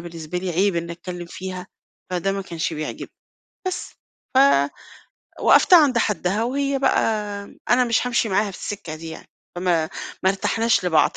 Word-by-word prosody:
بالنسبة 170 0 -6
لي 185 0 -3
عيب 185 +2 +2
إنّي 170 0 -3
أتكلّم 175 0 -7
فيها، 185 +1 -7 0.4
فده 185 +2 0
ما 195 0 -3
كانش 170 -2 -3
بيعجبني. 155 -1 -5 0.6
بس، 370 - -4 0.4
ف - - +5 1.0
وقّفتها 360 -4 +7
عند 265 -4 +2
حدّها 210 -1 0
وهي 275 +2 0
بقى 270 - +3 0.7
أنا 250 +1 +5
مش 235 +1 +1
هامشي 240 -2 +1
معاها 200 +1 +1
في 180 - -10
السِكّة 190 -6 -6
دي 160 +1 -8
يعني، - - -10 0.3
فما 175 -3 +1 0.3
ما 190 - +5
ارتحناش 200 +1 +1
لبعض. 160 -3 +4
190 Hz, 155 wpm, -22 LUFS, 170-225 Hz, 1.0 s, وقّفتها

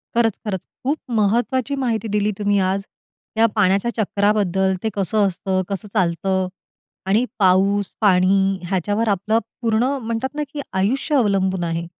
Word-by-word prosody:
खरंच, 230 -3 +2
खरंच. 195 -3 -2 0.2
खूप 285 +4 0 0.2
महत्वाची 240 +6 +1
माहिती 230 -2 -1
दिली 210 0 +1
तुम्ही 205 -1 +1
आज. 190 +1 +1 0.5
त्या 225 +1 +4
पाण्याच्या 200 +2 +2
चक्राबद्दल 200 -3 +1
ते 220 - +1
कसं 200 +1 +1
असतं, 190 +1 -1
कसं 200 +1 -4
चालतं 190 -1 +1 0.6
आणि 210 +6 +2
पाऊस, 195 +1 +3 0.2
पाणी 195 -1 +3
ह्याच्यावर 205 +4 0
आपलं 210 +3 +1 0.2
पुर्ण 225 -1 +2 0.2
म्हणतात 230 +5 -3
ना 300 - -1
की 290 - -3
आयुष्य 245 +10 0
अवलंबून 195 -6 +1
आहे. 165 0 -2
200 Hz, 140 wpm, -21 LUFS, 190-225 Hz, 0.6 s, त्या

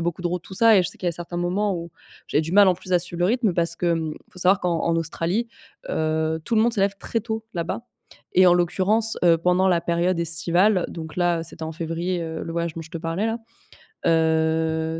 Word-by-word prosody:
a - - -2
beaucoup 175 +1 -3
de - - 0
route, 175 0 -3
tout - - -14
ça 225 +2 +5
et 185 - +5
je 175 - -2
sais - - -14
qu'il 180 - -5
y - - +4
a - - -6
certains 175 +1 -7
moments 190 +3 0
où 170 -1 -6 0.4
j'avais 150 - +1
du 160 +2 -5
mal, 205 +1 +7
en 185 - +3
plus, 185 +1 -8
à 180 - +5
suivre 175 0 -2
le 175 - +3
rythme 225 -3 +1
parce 170 -1 -1
que, 175 - -2
hem, 165 -2 0
il - - -19
faut - - -13
savoir 185 +1 +4
qu'en 170 -2 -1
en 165 0 +1
Australie, 165 +7 -1 0.4
heu, 160 0 -1
tout 235 - -1
le - - +5
monde 235 0 +2
se 205 - -1
lève 200 0 +1
très 230 - -2
tôt 220 0 -4
là-bas 170 +6 -3 0.5
et 185 0 +6
en 175 - +6
l'occurrence, 195 +6 +2
heu, 170 -1 +6
pendant 180 +3 +2
la 175 -2 +2
période 170 +1 0
estivale, 175 +4 +2
donc 160 -2 -8
là 175 -2 +1
c'était 165 0 -8
en 160 - -5
février, 170 +2 -3
heu, 160 -1 -5
le 165 - -6
voyage 170 -1 -2
dont 165 - -6
je 160 - -12
te 165 - -5
parlais 165 +6 -2
là, 225 +1 -2 0.7
heu, 160 0 +1
175 Hz, 255 wpm, -23 LUFS, 165-185 Hz, 0.7 s, mal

